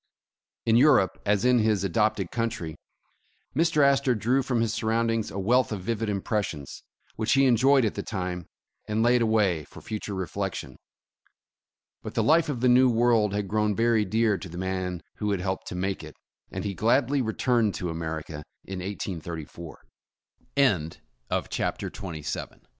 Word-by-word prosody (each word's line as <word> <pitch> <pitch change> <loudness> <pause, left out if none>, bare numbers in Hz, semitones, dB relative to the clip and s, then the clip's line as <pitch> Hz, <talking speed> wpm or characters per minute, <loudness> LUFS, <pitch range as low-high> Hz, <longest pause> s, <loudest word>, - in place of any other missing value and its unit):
In 115 0 +4
Europe, 125 - +4
as 105 +2 +2
in 125 -1 +5
his 110 -3 +2
adopted 100 0 0
country, 115 -9 -3 0.8
Mr. 155 -1 +3
Astor 140 -2 +3
drew 120 +5 +1
from 125 -3 0
his 115 -1 0
surroundings 115 0 0
a - - -7
wealth 120 +7 +2
of 105 -3 -3
vivid 115 +2 -2
impres 105 +1 0
sions, 70 -2 -8 0.4
which 110 0 +1
he 135 0 +5
enjoyed 130 +1 +4
at 105 - 0
the - - -4
time, 90 -4 -4 0.4
and 110 +1 +1
laid 120 +1 +4
away 105 -8 +2
for - - -13
future 105 -2 -5
reflection. 95 0 -4 1.3
But - - -8
the - - +2
life 160 +1 +4
of 125 -5 -3
the 125 - +3
new 125 +1 +6
world 115 -3 +3
had 105 -1 -2
grown 105 +1 +1
very 115 -1 +3
dear 110 0 +1
to 90 - -8
the 85 - -8
man 95 -1 -3
who 105 - -2
had 100 -2 0
helped 95 0 -3
to - - -5
make 95 +1 -2
it, - - -10 0.4
and - - -4
he 100 -1 -2
gladly 130 +7 +2
returned 115 -2 +1
to 90 -2 -3
America 80 -2 -5 0.2
in 95 -1 -5
183 85 -4 -6
105 Hz, 155 wpm, -26 LUFS, 95-120 Hz, 1.3 s, new